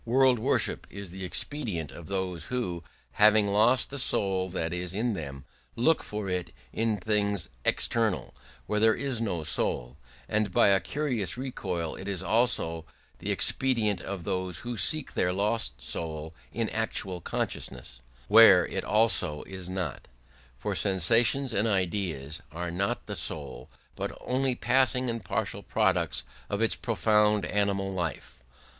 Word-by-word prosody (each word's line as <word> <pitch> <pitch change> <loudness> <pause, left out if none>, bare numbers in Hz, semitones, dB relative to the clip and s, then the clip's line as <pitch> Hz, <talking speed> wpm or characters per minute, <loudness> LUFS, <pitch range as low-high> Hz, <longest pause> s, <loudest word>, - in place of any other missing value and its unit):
World 130 0 +3
worship 130 +6 0
is 100 -2 -8
the 95 +1 -7
expedient 90 - -3
of 80 +3 -11
those 90 -3 -3
who, 90 -10 -3 0.3
having 105 -1 +4
lost 110 +7 +3
the 140 - -3
soul 95 -6 +1
that 85 -2 -3
is 90 +1 -4
in 115 +2 0
them, 70 -6 -7 0.3
look 150 +8 +2
for 105 -1 -5
it 90 -2 -2 0.2
in 110 -1 0
things 100 -2 0 0.2
external, 115 -4 +1 0.3
where 105 - -1
there 110 0 +4
is 130 -3 -2
no 90 -8 -2
soul: 60 -3 -1 0.3
and 105 -2 0
by 95 - +4
a 95 -1 +4
curious 125 -8 -1
recoil, 95 -11 -4
it 95 - -8
is 95 -2 -2
also 95 -8 +1 0.4
the - - -5
expedient 115 -6 +2
of 95 -2 -6
those 95 -2 -2
who 120 0 -3
seek 150 +8 +7
their 90 - +1
lost 100 - 0
soul 80 +4 -4 0.2
in 115 -1 -2
actual 95 -5 -2
consciousness, 60 -6 -4 0.3
where 100 -5 +8
it - - -4
also 105 -9 +2
is 95 -2 -8
not: 90 -6 -4 0.5
for - - -3
sensations 115 +7 +2
and 105 +2 +1
ideas 90 -6 -2
are 85 +2 -4
not 100 +3 -2
the - - -5
soul 70 -5 -3 0.3
but - - -5
only 130 0 0
passing 130 -1 +2
and 115 -2 -6
partial - - -3
products - - 0 0.3
of 100 - -2
its 115 0 +2
profound 105 -2 +2
animal 100 -1 -1
life. 85 -8 -5
100 Hz, 150 wpm, -28 LUFS, 90-115 Hz, 0.5 s, where